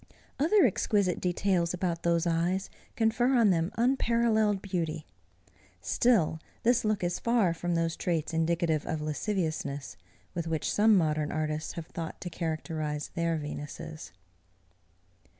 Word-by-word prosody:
Other 345 +7 +5
exquisite 200 -4 +1
details 180 -1 +1
about 175 -2 -2
those 170 0 +1
eyes, 175 +3 0 0.2
confer 240 +3 +2
on 225 -5 +5
them 165 0 +1
unparallelled 230 -4 +2
beauty. 165 -5 -3 0.7
Still, 205 -10 +2 0.2
this 240 +1 +3
look 215 -3 0
is 175 0 -1
far 230 -7 +2
from 175 +1 -2
those 165 -1 0
traits 165 -2 -2
indicative 165 -1 +1
of 160 - -2
lasciviousness, 150 - -2 0.4
with 170 -2 -3
which 160 -1 -1
some 215 0 +5
modern 155 -3 +1
artists 155 0 -2
have 170 - -6
thought 165 -1 -6
to 175 - -5
characterize 155 -3 -3
their 170 -1 0
Venuses. 150 - -7
170 Hz, 130 wpm, -29 LUFS, 160-205 Hz, 0.7 s, Other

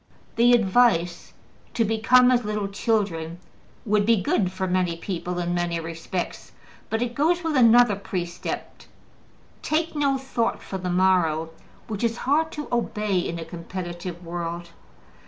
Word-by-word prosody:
The 240 +1 +5
advice 190 -6 +2 0.4
to 230 - +2
``become 250 +4 +4
as 245 -1 +2
little 210 -1 -2
children'' 195 -6 -1 0.5
would 210 -1 +2
be 225 0 +3
good 185 0 +1
for 190 0 -3
many 180 -2 0
people 180 0 -4
in 175 0 -1
many 175 -1 -1
respects, 165 +2 -5 0.4
but 225 +2 0
it 240 -1 -4
goes 340 +6 +1
with 320 -2 -1
another 240 -3 +6
precept, 180 -3 -5 0.7
``take 320 +2 0
no 280 -2 +1
thought 250 -3 -2
for 190 - -5
the 180 0 -3
morrow,'' 175 -3 +2 0.4
which 215 -1 -4
is 230 0 0
hard 315 +4 +2
to 300 -1 -5
obey 210 -5 0
in 170 -1 -3
a 165 - -6
competitive 175 +1 -7
world. 170 0 -5
195 Hz, 145 wpm, -24 LUFS, 175-240 Hz, 0.7 s, another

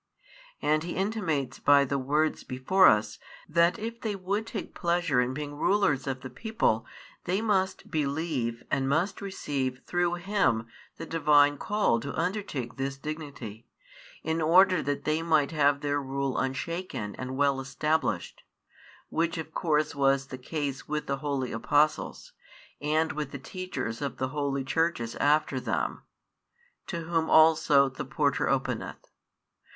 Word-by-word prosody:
And 155 +1 +3
He 170 +2 -4
intimates 180 - -1
by 140 -1 +5
the 140 +1 -1
words 150 +4 0
before 130 +10 +4
us, 105 0 +2 0.3
that 170 +4 +3
if 230 +1 -6
they 215 -3 -2
would 200 +4 -2
take 220 -4 -6
pleasure 170 -6 +1
in 125 +1 0
being 145 +2 -5
rulers 145 -6 +1
of 130 -1 -3
the 130 - -7
people 125 - 0 0.4
they 185 +3 +1
must 195 -4 0
believe 140 -5 -1
and 135 0 +1
must 175 +8 0
receive 135 -10 -3
through 175 0 +1
Him 175 - +1 0.3
the - - -6
Divine 145 -3 +4
call 210 - +1
to 140 +4 -6
undertake 165 - -3
this 135 +1 -3
dignity, 140 -7 -7 0.6
in 160 +1 -1
order 180 +2 +5
that 145 0 -2
they 155 +1 0
might 155 -3 +2
have 145 -2 +2
their 145 0 0
rule 135 0 -2
unshaken 135 - -3
and 130 +1 -5
well 140 -1 +2
established; 135 - -1 0.7
which 170 +1 0
of 160 -1 -6
course 155 -3 +1
was 135 -1 +2
the 130 - -6
case 140 0 -4
with 150 0 -2
the 140 - -1
holy 140 -3 -2
Apostles, 145 +6 0 0.5
and 155 +2 +1
with 150 -2 -4
the 140 - -6
Teachers 145 - -5
of 140 -4 -3
the 130 - -1
holy 140 -1 -1
Churches 130 -5 0
after 145 -2 +2
them; - - -2 0.9
to 170 -3 -3
whom 165 -1 -1
also 155 -3 +6
the 130 -1 -6
porter - - 0
openeth. - - -2
150 Hz, 145 wpm, -28 LUFS, 135-170 Hz, 0.9 s, also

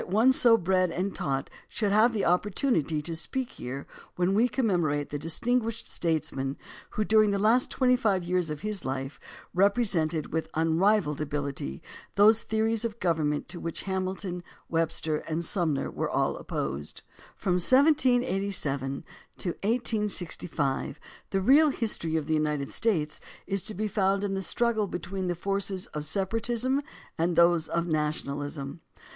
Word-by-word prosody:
CALHOUN 180 - -7
161 220 +4 +4
one 245 -3 +6
so 200 - -8
bred 185 0 +2
and 185 +3 -2
taught 135 -1 -2 0.2
should 210 -3 -1
have 220 +4 +5
the 215 -4 -1
opportunity 180 - +1
to 165 +1 -3
speak 260 +9 -3
here 135 +3 -6 0.3
when 180 +2 +1
we 230 +5 +3
commemorate 175 - 0
the 145 - -3
distinguished 230 - -1
statesman 140 -5 -1 0.3
who, 215 - -1
during 215 -1 +5
the 200 - +1
last 225 +5 +3
twenty 250 -1 +3
five 200 -7 +1
years 180 -2 0
of 150 -1 -5
his 210 -4 -2
life, 135 +1 -4 0.3
represented 185 -7 +1
with 160 0 -1
unrivalled 165 0 +2
ability 140 - -4 0.3
those 215 +2 +6
theories 220 0 0
of 230 -1 -3
government 155 -5 0
to 175 - -7
which 165 -1 -4
Hamilton, 190 -1 -3 0.3
Webster, 165 -1 0
and 160 +2 -3
Sumner 160 -7 0
were - - -2
all - - +1
opposed. 70 +2 -5 0.3
From 180 -2 +1
1787 200 - +2 0.3
to 185 - -2
1865 200 - -1 0.3
the 195 - 0
real 290 +9 +6
history 215 - -1
of 155 -2 0
the 160 - -1
United 150 -2 0
States 165 -10 0 0.3
is 195 0 -1
to 215 - -2
be 215 +3 -1
found 195 -1 +1
in 200 -1 -1
the 195 - -1
struggle 220 +2 0
between 185 +1 -4
the 175 - -1
forces 195 +1 -2
of 150 0 -4
separatism 225 - 0 0.4
and 170 +1 +1
those 170 -1 +4
of 170 0 -1
nationalism. 145 -2 -2
185 Hz, 150 wpm, -28 LUFS, 155-215 Hz, 0.4 s, one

